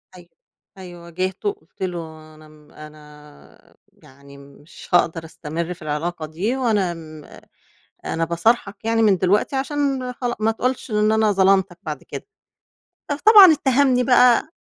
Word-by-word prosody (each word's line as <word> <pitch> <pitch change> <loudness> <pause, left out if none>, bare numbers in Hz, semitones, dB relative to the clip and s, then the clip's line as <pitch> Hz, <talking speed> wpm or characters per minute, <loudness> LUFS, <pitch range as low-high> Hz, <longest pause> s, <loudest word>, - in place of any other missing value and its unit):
أيوه، 175 -1 -16 0.5
أيوه 175 -2 -11
واجهته 185 - -3
قُلت 400 - -12
له 160 -3 -7
أنا 155 0 -17
م 150 -1 -21
أنا 150 -1 -16 0.3
يعني 140 +1 -17
مش 140 +3 -16
هاقدر 165 -2 +1
أستمر 165 +2 -6
في 175 - -20
العلاقة 155 +2 -4
دي 180 +11 -3
وأنا 210 -8 0
م 155 -2 -12 0.8
أنا 165 0 -2
باصارحك 200 +5 -1
يعني 225 0 +1
من 205 -3 +4
دلوقتي 200 +9 +1
عشان 270 -2 -2
خلا 245 -1 -4
ما 220 +1 +2
تقولش 250 +3 -3
إن 215 0 +1
أنا 220 -1 +2
ظلمتك 190 -2 +2
بعد 150 -3 -6
كده. - - -9 0.8
فطبعًا 385 +4 +7
اتّهمني 265 -3 +2
بقى 250 +2 +4
185 Hz, 140 wpm, -21 LUFS, 155-240 Hz, 0.8 s, فطبعًا